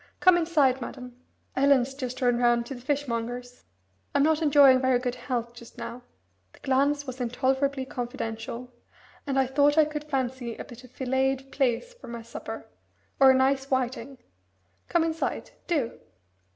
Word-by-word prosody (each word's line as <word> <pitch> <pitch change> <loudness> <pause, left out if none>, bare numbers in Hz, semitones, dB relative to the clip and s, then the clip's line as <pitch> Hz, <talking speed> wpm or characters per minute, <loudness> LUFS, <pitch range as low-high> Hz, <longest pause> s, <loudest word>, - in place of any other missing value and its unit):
Come 370 -1 +6
inside, 300 -7 +2
madam. 250 0 -8 0.4
Ellen's 270 -1 +3
just 255 -1 -5
run 245 -1 +3
round 240 -1 +3
to 270 - -6
the 245 - -9
fishmonger's. 245 -3 -3 0.5
I'm 280 - +4
not 315 +1 +2
enjoying 280 -4 +6
very 260 -1 +3
good 245 0 -2
health 245 -1 -4
just 235 -1 -14
now" 245 - -6 0.5
the - - -19
glance 285 +2 +1
was 255 -1 -6
intolerably 265 +2 0
confidential 240 -1 -5 0.6
"and 270 -1 0
I 265 - +4
thought 285 +3 +3
I 310 - +7
could 300 0 -5
fancy 260 -4 -2
a - - -7
bit 245 -2 -12
of 255 - -14
filleted 265 +1 -1
plaice 275 - 0
for - - -14
my 235 -1 -7
supper, 230 - -7 0.5
or 270 -1 +8
a 265 - +6
nice 270 +1 +2
whiting. 260 +1 -2 0.7
Come 340 -2 +3
inside, 325 0 -2 0.2
do!" 290 -9 -1
260 Hz, 160 wpm, -27 LUFS, 245-280 Hz, 0.7 s, or